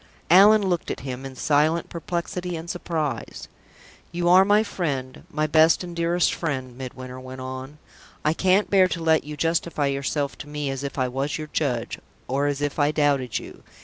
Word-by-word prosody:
Allan 200 +3 +7
looked 175 -2 -1
at - - -4
him, 130 0 -5
in 130 - -11
silent 155 +5 +1
perplexity 175 +1 -4
and 165 +1 -7
surprise. 160 - -3 0.6
"You 175 0 0
are 185 +2 +8
my 205 +2 +4
friend 140 -11 -4
my 155 +1 -1
best 160 +3 +4
and 175 -1 -7
dearest 170 +1 +1
friend," 130 -6 -3
Midwinter 130 0 -8
went 130 0 -9
on. 130 +3 -7 0.5
"I 155 - +3
can't 190 +4 +3
bear 190 -2 +6
to 170 -2 -4
let 160 -1 +3
you 150 0 -7
justify 165 -2 0
yourself 140 +1 -1
to 145 - -9
me 150 -2 -3
as 135 0 -5
if 140 0 -5
I 130 -1 +1
was 135 +3 -2
your 155 -1 -7
judge, 125 -7 -1 0.3
or 140 +3 0
as 145 0 -2
if 145 +1 -2
I 145 0 +4
doubted 140 -5 +1
you." - - -9
150 Hz, 185 wpm, -24 LUFS, 135-170 Hz, 0.6 s, are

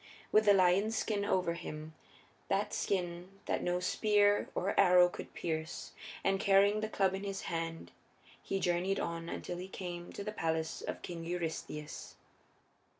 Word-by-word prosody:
With 215 0 +5
the 205 - +7
lion's 195 +4 +3
skin 205 -2 0
over 185 -4 +1
him 155 -2 -7 0.5
that 195 +1 0
skin 180 0 -2
that - - 0
no 180 0 0
spear 205 +2 +3
or 195 +3 0
arrow 180 -2 +7
could - - -9
pierce 160 -1 -3 0.3
and 195 0 +2
carrying 200 +2 +4
the 215 0 -2
club 195 -3 +2
in 195 +1 -4
his 195 -1 -3
hand 165 -1 -4 0.5
he 195 - -2
journeyed 180 +2 +1
on 170 0 -3
until 175 - -4
he 180 +1 -6
came 175 -2 -6
to 200 - -5
the 210 - -3
palace 160 -5 -2
of - - -5
King 170 -2 -5
Eurystheus. 160 -3 -5
180 Hz, 155 wpm, -33 LUFS, 170-200 Hz, 0.5 s, the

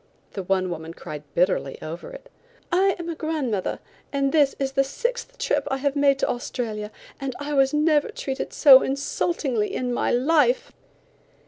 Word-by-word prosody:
The 195 - -4
one 185 0 0
woman 165 0 -6
cried 150 -1 -7
bitterly 175 -6 +1
over 165 - -7
it. - - -12 0.4
"I 380 +2 +3
am 345 -1 -6
a 335 - -2
grandmother, 300 - -2 0.3
and 275 -1 +1
this 290 -3 +3
is 270 -1 -1
the 270 0 +2
sixth 485 - -4
trip - - 0
I 270 - 0
have 280 +1 -1
made 280 -1 +4
to - - 0
Australia, 220 -4 -3 0.3
and 270 -2 -4
I 290 +1 -4
was 270 -1 +4
never 300 0 +2
treated 265 -1 -4
so 270 -3 +8
insultingly 270 -4 -1
in 250 -1 -2
my - - 0
life." 330 - +2
275 Hz, 165 wpm, -24 LUFS, 235-315 Hz, 0.4 s, so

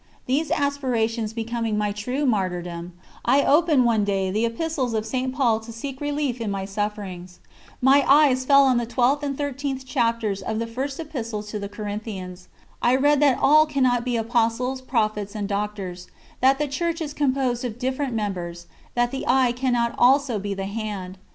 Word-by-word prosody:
These 285 +4 0
aspirations 250 -7 0
becoming 225 -1 -2
a 210 -1 0
true 250 +8 -2
martyrdom, 180 -6 -2 0.3
I 275 +4 +4
opened, 300 -4 +4
one 225 -3 +3
day, 195 -2 0
the 220 +4 +1
Epistles 255 -1 -2
of 215 0 -1
St. 255 +3 -2
Paul 245 -5 +2
to 225 +1 -10
seek 265 +4 -7
relief 290 -4 -2
in 220 - -2
my 195 -1 -3
sufferings. 195 -3 -5 0.4
My 275 +2 +6
eyes 275 -3 +5
fell 275 +1 +6
on 260 -2 +3
the 240 -1 -1
12th 255 +4 +2
and 280 -2 -3
13th 275 -2 -3
chapters 230 -6 0
of 220 +2 -3
the 230 - -1
First 265 +5 -4
Epistle 230 -9 -4
to 210 0 -5
the 200 0 -5
Corinthians. 205 -3 -6 0.3
I 245 +2 +4
read 290 +2 +3
that 285 -3 +4
all 310 +2 +5
cannot 255 -5 +1
become 235 -3 -1
Apostles, 240 +3 0
Prophets, 215 -5 -1
and 205 -2 -2
Doctors; 200 -3 -4 0.3
that 265 +1 +4
the 295 +1 -1
Church 335 +4 -2
is 300 -3 -4
composed 260 -4 0
of 235 -3 -4
different 260 0 -2
members; 175 -5 -4 0.3
that 240 0 +1
the 270 - -4
eye 255 -1 +4
cannot 245 -1 0
also 255 -2 +4
be 200 0 -3
the 195 0 -4
hand. 200 -3 -5
240 Hz, 175 wpm, -24 LUFS, 210-270 Hz, 0.4 s, My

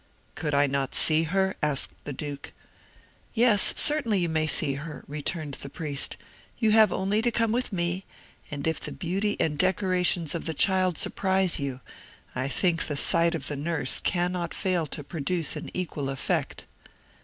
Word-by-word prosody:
"Could 150 -2 -2
I 140 +1 +4
not 135 -1 -2
see 160 +1 +5
her?" 190 +3 0
asked 150 -2 0
the - - -4
Duke. 145 0 -7 0.8
"Yes, 225 -4 +4
certainly 285 -9 +3
you 175 -2 0
may 155 -1 0
see 140 -2 +1
her," 150 +2 -7
returned 150 +1 -3
the 140 - -6
priest. 145 -2 -3 0.4
"You 220 -2 +2
have 215 -2 +6
only 200 +3 0
to 240 - +2
come 230 -1 0
with 245 +1 -1
me; 175 0 -2 0.4
and 145 -3 -5
if 160 0 0
the - - -5
beauty 195 +4 -2
and 150 -2 0
decorations 185 -3 +2
of 170 - -4
the 160 - -2
child 185 0 +3
surprise 190 -2 +2
you, 135 -2 -4 0.5
I 130 +1 -2
think 165 +4 0
the 145 - -3
sight 170 +3 +4
of 165 - -3
the 145 - -2
nurse 145 -2 0
cannot 175 -1 -1
fail 180 -4 0
to 145 - -4
produce 165 +2 -1
an - - -6
equal 155 -6 -3
effect." 135 -1 -2
170 Hz, 170 wpm, -26 LUFS, 145-190 Hz, 0.8 s, have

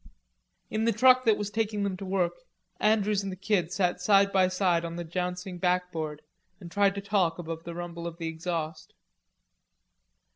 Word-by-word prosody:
In 220 +1 0
the 230 - +4
truck 255 +4 +5
that 220 -2 +4
was 205 -1 -3
taking 215 -1 -1
them 200 -2 -1
to 195 - -7
work, 185 -2 0 0.4
Andrews 210 -1 +2
and 195 -1 -4
the - - -5
Kid 185 -3 0
sat 180 -2 0
side 200 +1 +4
by 190 -1 +5
side 185 -2 +1
on 170 0 -5
the 175 - -4
jouncing 180 +2 -4
backboard 180 -4 -1 0.4
and 175 -4 -10
tried 200 +1 +3
to 200 - -3
talk 195 -4 +1
above 165 -1 -6
the 170 0 -6
rumble 170 -1 -5
of 170 -1 -7
the 165 -2 -4
exhaust. 160 -1 -4
180 Hz, 180 wpm, -28 LUFS, 170-200 Hz, 0.4 s, truck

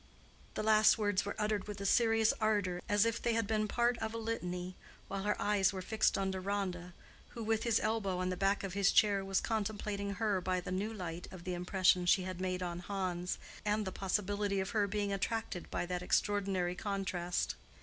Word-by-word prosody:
The - - -2
last 215 0 +6
words 205 -3 +1
were 200 - -3
uttered 210 -2 -1
with 210 -1 -6
a 200 - -4
serious 225 +1 +4
ardor 205 -5 +1
as 205 +1 +4
if 230 0 0
they 235 - +1
had 225 -1 +1
been 215 0 0
part 240 +2 +1
of 220 0 -3
a - - -2
litany, 180 -5 -3 0.3
while 195 0 -3
her 210 +1 0
eyes 205 -1 +3
were 190 -2 -5
fixed 220 +3 +2
on 195 -1 0
Deronda, 185 -2 -3 0.4
who 230 - -4
with 220 0 +1
his 230 -2 +2
elbow 215 -4 0
on 185 0 -1
the 185 - -1
back 195 +2 +1
of 195 -3 -4
his 195 0 +3
chair 200 -2 +4
was 195 0 +1
contemplating 205 -2 -2
her 205 -3 0
by 185 0 0
the 180 - -6
new 200 +4 -1
light 175 -5 -5
of 185 -2 -10
the 180 - -3
impression 180 0 +2
she 190 +1 +5
had 185 -1 -5
made 185 -1 -1
on 175 -1 -3
Hans, 180 -2 -2 0.3
and 210 0 0
the 190 - -3
possibility 200 +1 -1
of 190 0 -2
her 210 -3 +2
being 205 0 -1
attracted 195 -2 -3
by - - -2
that 180 0 -3
extraordinary 190 -2 +1
contrast. 185 -3 -2
200 Hz, 205 wpm, -34 LUFS, 185-215 Hz, 0.4 s, last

